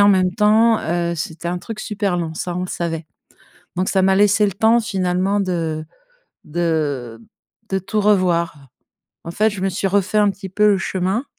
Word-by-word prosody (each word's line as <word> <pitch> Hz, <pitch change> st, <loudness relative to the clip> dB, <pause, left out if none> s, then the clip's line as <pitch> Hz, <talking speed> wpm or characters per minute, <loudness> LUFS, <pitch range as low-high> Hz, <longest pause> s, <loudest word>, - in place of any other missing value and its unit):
en 200 Hz, -, +7 dB
même 185 Hz, -2 st, +3 dB
temps, 220 Hz, +2 st, +4 dB
heu, 170 Hz, +1 st, -1 dB
c'était 160 Hz, +1 st, -5 dB
un 180 Hz, +1 st, -2 dB
truc 215 Hz, +3 st, -7 dB
super 205 Hz, -4 st, -2 dB
long, 165 Hz, -2 st, -3 dB
ça, 175 Hz, +2 st, -4 dB
on -, -, -2 dB
le -, -, -3 dB
savait. 165 Hz, -3 st, -3 dB, 0.7 s
Donc, 185 Hz, +1 st, 0 dB
ça 190 Hz, -, +2 dB
m'a 190 Hz, 0 st, +4 dB
laissé 205 Hz, +1 st, +4 dB
le 200 Hz, -, -1 dB
temps 220 Hz, +5 st, +3 dB
finalement 190 Hz, -1 st, 0 dB
de 165 Hz, -5 st, -2 dB, 0.6 s
de 150 Hz, -8 st, -2 dB, 0.5 s
de 190 Hz, -, 0 dB
tout 210 Hz, +3 st, -2 dB
revoir. 175 Hz, -8 st, +1 dB, 0.6 s
En -, -, -4 dB
fait, 215 Hz, +5 st, +2 dB
je 200 Hz, -2 st, -7 dB
me 195 Hz, -, +1 dB
suis 190 Hz, +2 st, -2 dB
refait 200 Hz, +2 st, +1 dB
un 205 Hz, -1 st, +4 dB
petit 195 Hz, 0 st, -8 dB
peu 210 Hz, +3 st, +2 dB
le 195 Hz, -, +1 dB
chemin, 190 Hz, +7 st, -1 dB
185 Hz, 190 wpm, -20 LUFS, 170-205 Hz, 0.7 s, en